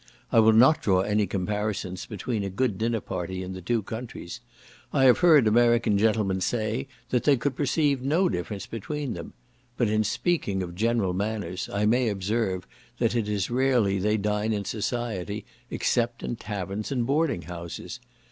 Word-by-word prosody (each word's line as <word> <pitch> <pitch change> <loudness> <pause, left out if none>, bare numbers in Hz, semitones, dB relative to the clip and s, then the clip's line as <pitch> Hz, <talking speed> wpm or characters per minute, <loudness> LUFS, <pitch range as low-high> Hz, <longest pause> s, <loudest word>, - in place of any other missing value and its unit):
I - - +5
will 110 0 +6
not 130 +8 +6
draw 95 -2 +3
any 105 +1 +1
comparisons 100 0 -3
between 105 +1 -3
a 100 - -2
good 105 0 -1
dinner 115 -1 0
party 95 +1 -4
in 95 +1 -6
the 95 - -7
two 110 +4 0
countries; 115 -1 -7 0.5
I 135 - +2
have 125 -2 +6
heard 160 -8 +6
American 115 0 +4
gentlemen 105 -3 +1
say, 115 +5 -1 0.2
that 125 - +1
they 145 -2 +4
could 135 +2 -1
perceive 140 -1 +1
no 160 +8 +2
difference 100 - -3
between 135 +4 -4
them; - - -8 0.4
but 120 -4 +2
in 110 0 +2
speaking 105 - 0
of 85 -1 -6
general 110 -1 +1
manners, 100 -2 -3
I 100 +1 0
may 120 +2 +3
observe, 100 -1 -1 0.3
that - - +1
it 110 -3 0
is 100 0 -1
rarely 120 -6 +2
they 105 +3 +1
dine 105 +1 0
in 100 -1 -2
society, 105 -2 -3 0.2
except 120 -1 0
in - - -2
taverns 105 0 -5
and 125 -3 0
boarding 140 - +1
houses. 85 0 -7
110 Hz, 170 wpm, -26 LUFS, 100-120 Hz, 0.5 s, will